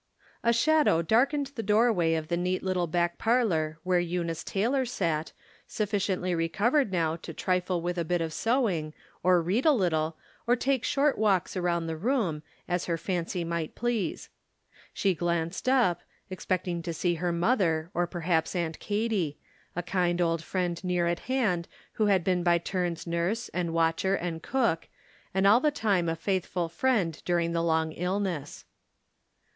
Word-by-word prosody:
A 235 - +4
shadow 285 - +3
darkened 275 - +2
the 230 - -4
doorway 210 -6 +3
of 160 -1 -3
the 170 - 0
neat 180 +1 -1
little 185 -2 0
back 175 +1 0
parlor 180 -10 +1
where 180 -1 +2
Eunice 170 -2 -2
Taylor 245 +7 0
sat, 165 -10 -2 0.4
suf 210 -2 -3
ficiently 185 -3 0
recovered 205 - +1
now 165 -3 +1
to 165 -1 -9
trifle 180 -2 0
with 175 0 -2
a - - +1
bit 175 +2 0
of 165 -1 -3
sew 240 - +2
ing, 155 -5 -3 0.3
or 180 -1 +4
read 200 +10 +1
a 315 - +6
little, 165 - 0 0.3
or 240 - +5
take 265 0 0
short 285 -2 +1
walks 200 -5 +2
around 175 -2 0
the 165 0 -3
room, 200 - 0 0.3
as 175 0 -1
her 170 -1 -1
fancy 175 0 -2
might 170 -1 -3
please. 240 -4 -2 0.6
She 195 -2 +1
glanced 170 +6 -1
up, 235 -10 +3 0.3
expecting 180 -2 -2
to 170 0 -4
see 175 +2 +1
her 175 -1 +1
mother, 170 -3 +1
or 175 0 0
perhaps 170 -1 -1
Aunt 165 -3 -2
Katy 205 -8 -1 0.2
— - - -34
a 175 - -2
kind 175 0 0
old 165 -2 +1
friend 180 -1 -2
near 180 -1 +1
at 170 0 0
hand, 210 -10 +1 0.2
who 215 - +1
had 190 -4 +3
been 180 0 +1
by 175 0 +4
turns 175 -1 -2
nurse, 170 +7 -1
and 175 -2 -2
watcher, 165 +4 +1
and 170 -3 -4
cook, 230 -11 0 0.4
and 190 +1 +1
all 210 +4 +7
the 300 - +3
time 200 - +1
a 165 - -1
faithful 180 -1 -1
friend 190 - 0
during 170 -1 +1
the 170 0 0
long 160 -1 +1
Ul 180 +3 -1
ness. 165 -8 -4
180 Hz, 175 wpm, -28 LUFS, 170-210 Hz, 0.6 s, all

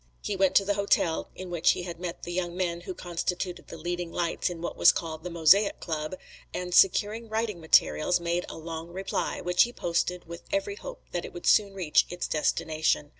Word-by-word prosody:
He 205 - -2
went 190 -1 +2
to 195 - +5
the 205 - +1
hotel 200 -5 +1
in 185 -1 -8
which 170 -1 +3
he 180 - -5
had 170 -2 -7
met 175 -1 -6
the 175 - -5
young 175 -1 -2
men 175 -2 -1
who 180 +1 -6
constituted 175 +1 -3
the 165 - -9
leading 175 +1 -4
lights 170 +2 -1
in 175 -2 -6
what 170 - -4
was - - +7
called 160 -1 -5
the 180 - -4
Mosaic 170 +5 +4
Club, 155 +1 -3 0.4
and, 180 0 -4
securing 210 +5 +3
writing 220 -5 -2
materials, 160 +2 +3
made 170 +1 -1
a - - -8
long 165 0 -6
reply, 190 +3 -3
which 180 0 +2
he 240 - +4
posted 175 -3 -1
with 170 +1 -8
every 310 +8 -1
hope - - -9
that 175 - -2
it - - -8
would 175 - -8
soon 200 -2 +4
reach 175 -6 +2
its 175 0 -4
destination. 155 -1 0
175 Hz, 210 wpm, -28 LUFS, 170-190 Hz, 0.4 s, was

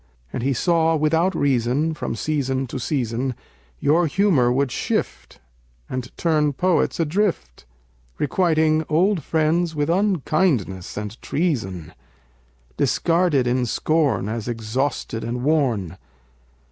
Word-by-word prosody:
And - - -3
he 135 +3 0
saw 165 +4 +2
without 165 +4 +1
reason, 140 +3 +1
from 150 - -4
season 135 0 -1
to 130 - -6
season, 125 -1 -2 0.4
Your 165 +4 +3
humor 155 -8 +3
would 135 0 +1
shift, - - -3 0.5
and 130 -1 -4
turn 155 -3 +1
poets 180 +4 +1
adrift, 165 - -1 0.5
Requiting 155 0 +2
old 180 +4 +2
friends 160 +3 0
with 150 +2 0
unkindness 155 - 0
and 105 +2 -6
treason, 115 - -2 0.8
Discarded 165 -6 +2
in 125 0 +1
scorn 155 -4 +1
as 110 0 -4
exhausted 115 +1 -2
and 120 +2 -3
worn. 120 - 0
145 Hz, 110 wpm, -22 LUFS, 120-165 Hz, 0.8 s, Your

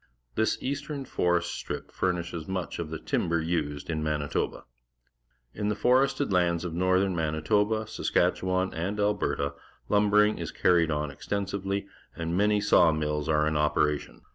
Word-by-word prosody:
This 110 0 +1
east 140 +2 -3
ern 140 -3 -4
forest 85 -5 0
strip - - -6
furnishes 85 -3 -2
much 95 -4 -3
of 85 -2 -4
the 80 - -4
timber 85 +2 0
used 80 -3 -2
in 80 -2 -2
^Manitoba. 75 -1 -2 0.9
In 105 0 -2
the 105 - 0
forested 135 -1 +2
lands 85 -1 +2
of 85 - -4
northern 95 +2 +2
Manitoba, 95 +8 +1
Saskatchewan, 95 -3 0
and 95 +6 -3
Alberta, 100 -8 0 0.4
lumbering 105 +1 +4
is 85 -3 -4
carried 85 -3 +3
on 75 -1 -1
extensively, 100 +5 -3 0.3
and 85 0 -3
jTiany_§aw 100 -4 +4
mill.s 75 -1 -1
are 75 -1 +2
in 80 - 0
operation. 75 0 0
90 Hz, 140 wpm, -28 LUFS, 80-105 Hz, 0.9 s, lumbering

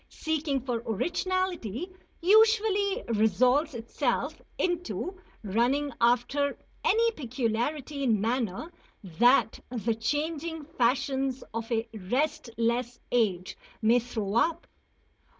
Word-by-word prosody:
Seeking 310 -4 -1
for 240 -2 -2
originality 350 - -1 0.3
usually 425 +1 +4
resolves 250 - +3
itself 250 +5 -2 0.2
into 360 +1 -2 0.2
running 245 +8 +1
after 250 +4 +2 0.3
any 460 +2 +3
peculiarity 260 - -2
in 230 -6 +2
manner 230 - -1 0.3
that 225 +6 +3
the 235 -2 -1
changing 300 +7 -2
fashions 265 -1 0
of 230 +1 -4
a 230 0 0
restless 235 +1 -1
age 200 -7 +1 0.3
may 230 +3 +5
throw 220 -4 -4
up. 325 +9 +1
255 Hz, 95 wpm, -28 LUFS, 230-315 Hz, 0.3 s, may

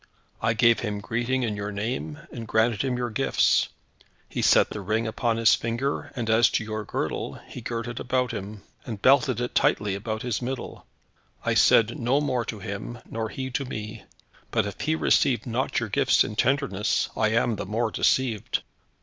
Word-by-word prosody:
I 115 - +2
gave 115 0 +5
him 105 -3 -3
greeting 120 +5 -1
in 110 -3 -1
your 100 0 -4
name, 120 +9 -3
and 115 -2 -7
granted 110 0 +2
him 130 -2 -1
your 120 -1 -2
gifts. 110 - +2 0.6
He - - -3
set - - +5
the 105 - -5
ring 110 +4 0
upon 115 +1 0
his 115 0 +5
finger, 135 +5 -2
and 120 -4 -3
as 110 +1 +5
to - - +1
your 110 0 -4
girdle, - - -3
he 125 - -8
girt 115 0 -4
it 120 0 -5
upon 125 0 0
him, 100 0 -6 0.2
and 110 -4 -6
belted 130 0 +4
it 125 0 -3
tightly 105 -2 +2
about 110 +2 -4
his 120 -2 -2
middle. 130 +1 -5 0.6
I - - +2
said 115 +1 +4
no 125 +4 +2
more 130 -5 0
to 110 - -5
him, 100 +4 -6
nor 110 -1 -3
he 130 +2 -5
to 140 - -1
me; 110 -3 -6 0.5
but - - +1
if - - -6
he - - +1
received 80 -2 +2
not - - -1
your - - -3
gifts - - +4
in 105 - -5
tenderness, 125 -4 +1
I 110 - +2
am 115 0 +1
the - - -5
more 110 +2 0
deceived. 120 -4 +1
115 Hz, 190 wpm, -26 LUFS, 105-125 Hz, 0.6 s, gave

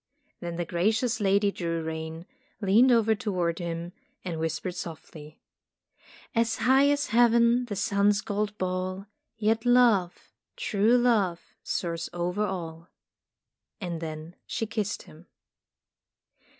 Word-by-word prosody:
Then 170 -1 -5
the 175 0 -2
gracious 220 +8 0
Lady 200 +1 +3
drew 165 -3 -3
rein, 160 +1 -5 0.3
leaned 220 +5 +5
over 225 -2 +4
toward 185 -7 -2
him, 170 0 -5 0.3
and 170 -3 -3
whis 160 -1 -1
pered 180 - -4
softly: 155 -3 -9 0.9
"As 230 -1 +1
high 265 +4 +4
as 290 0 0
Heaven 235 +1 +4
the 215 -4 -5
sun's 200 +1 +2
gold 210 0 -2
ball 185 +1 -3 0.2
— - - -55
Yet 220 +1 +1
love, 235 -8 +3 0.2
true 235 - +2
love, 215 -8 +1
soars 170 -1 -3
over 180 +4 -1
all." 170 -4 -5 0.9
And 175 -5 -4
then 160 +1 -7
she 225 - -2
kissed 215 -2 -3
him. 160 +4 -16
195 Hz, 125 wpm, -27 LUFS, 170-225 Hz, 0.9 s, leaned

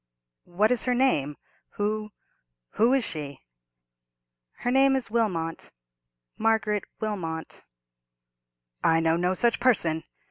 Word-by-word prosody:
"What 205 +6 +2
is 250 - +1
her 250 -1 +1
name?—who—who 210 - -2
is 270 -2 +2
she?" 145 -7 -5 1.2
"Her 245 - 0
name 270 +1 +4
is 260 -5 -3
Wilmot—Margaret 165 - -2
Wilmot." 170 -7 -4 1.2
"I 165 0 +4
know 165 0 +2
no 180 +2 0
such 235 +3 +1
person!" 165 -11 +2
190 Hz, 95 wpm, -26 LUFS, 155-230 Hz, 1.2 s, name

